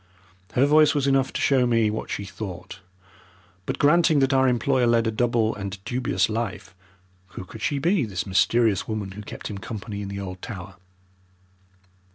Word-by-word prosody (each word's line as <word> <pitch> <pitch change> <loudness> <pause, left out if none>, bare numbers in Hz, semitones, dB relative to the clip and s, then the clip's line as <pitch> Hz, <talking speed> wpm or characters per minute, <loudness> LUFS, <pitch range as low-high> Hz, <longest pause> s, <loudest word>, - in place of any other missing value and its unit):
Her 130 - +4
voice 150 +1 +5
was 140 -2 +1
enough 135 -1 +2
to - - -4
show 130 -3 +3
me 115 -3 +2
what 110 - -5
she 100 - -4
thought. 95 -2 -8 0.9
But - - -2
granting 160 +1 +4
that 135 0 +2
our 130 0 +4
employer 125 0 +2
led 115 -1 +3
a 115 - +1
double 115 -1 +1
and 100 -1 -6
dubious 125 0 0
life, 110 -4 -4 0.6
who 90 - -6
could 105 +4 -11
she 145 +5 0
be, 165 +1 +1
this 95 -5 -4
mysterious 100 +2 +2
woman 105 -3 -4
who 105 +2 -8
kept 105 - -10
him 100 -2 -6
company 105 -1 -6
in 100 - -5
the 100 0 -5
old 95 -1 -7
tower? 95 -3 -8
115 Hz, 180 wpm, -24 LUFS, 100-130 Hz, 0.9 s, voice